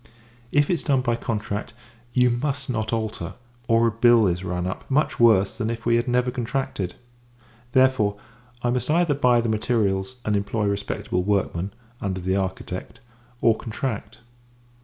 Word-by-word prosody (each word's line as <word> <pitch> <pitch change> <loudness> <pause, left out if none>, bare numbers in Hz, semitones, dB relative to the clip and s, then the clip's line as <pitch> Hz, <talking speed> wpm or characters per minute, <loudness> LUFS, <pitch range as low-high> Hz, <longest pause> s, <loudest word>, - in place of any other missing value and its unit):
If 145 0 +3
it - - +2
is 170 - -1
done 135 -3 +2
by 120 -2 +1
contract, 105 -1 -3 0.4
you 125 0 +4
must 135 +2 -1
not 110 -2 -2
alter; 110 -7 -3 0.3
or 115 0 +4
a 115 - +3
bill 115 0 +5
is 90 -1 0
run 90 -1 -2
up, 95 - -5
much 150 +3 +1
worse 110 -4 +5
than 110 -2 -2
if 115 -1 -5
we 115 0 +4
had 120 - -1
never 125 0 +2
contracted. 120 -7 -3 0.8
Therefore, 130 -6 +3 0.5
I 120 - +2
must 125 +3 -1
either 170 -1 +3
buy 125 -4 +3
the 115 - -2
materials, 110 -1 0
and 105 - +1
employ 100 +2 -1
respectable 100 -2 -1
workmen, 95 -1 0 0.3
under 95 -2 -2
the 95 +1 0
architect; 95 -1 -4 0.4
or, 115 -1 +5
contract. 115 -1 -5
115 Hz, 160 wpm, -24 LUFS, 100-125 Hz, 0.8 s, bill